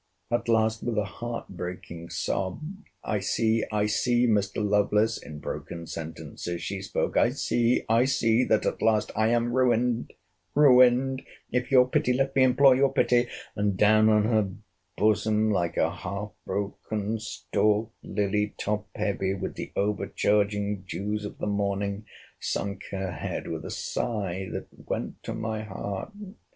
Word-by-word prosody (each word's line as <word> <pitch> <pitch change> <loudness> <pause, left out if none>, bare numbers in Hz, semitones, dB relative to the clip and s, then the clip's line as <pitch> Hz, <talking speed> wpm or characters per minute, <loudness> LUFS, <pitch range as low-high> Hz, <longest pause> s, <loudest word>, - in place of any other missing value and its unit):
At 120 0 0
last, 110 -1 +2
with 120 -2 -2
a 105 - +3
heart 115 +4 -6
breaking 90 -2 -7
sob, 90 +3 -2 0.4
I 105 - -1
see, 110 +3 +1
I 105 -1 +1
see, 120 +3 +2
Mr. 105 -2 +1
Lovelace, 105 +2 +2
in 75 - -9
broken 85 +2 -6
sentences 85 +2 -6
she 100 -1 -3
spoke—I 95 - +1
see, 120 +1 +1
I 115 +3 +4
see—that 115 -3 +2
at - - -1
last—I 110 0 +2
am 120 +1 +1
ruined!—Ruined, 125 +1 +3 0.3
if 125 0 0
your 125 -2 +6
pity—let 130 +2 +1
me 135 - +4
implore 130 +1 +6
your 135 +1 +3
pity!—and 120 -6 0
down 110 +1 +5
on 105 -1 +4
her 110 -2 +2 0.5
bosom, 110 +1 +2
like 85 -4 0
a - - +1
half 100 +3 -5 0.2
broken 105 +2 -3
stalked 110 0 0
lily 105 +1 -1
top 105 -1 -2
heavy 100 -2 -1
with 95 - -4
the - - -6
overcharging 105 0 0
dews 105 +3 -3
of - - -7
the - - -3
morning, 100 0 -1 0.3
sunk 100 -1 -3
her 95 -2 -3
head, 75 - -4
with - - -4
a - - -5
sigh 95 -5 -3
that - - -4 0.2
went - - -3
to - - -5
my 110 -1 -3
heart. 100 - -5
105 Hz, 140 wpm, -27 LUFS, 100-115 Hz, 0.5 s, your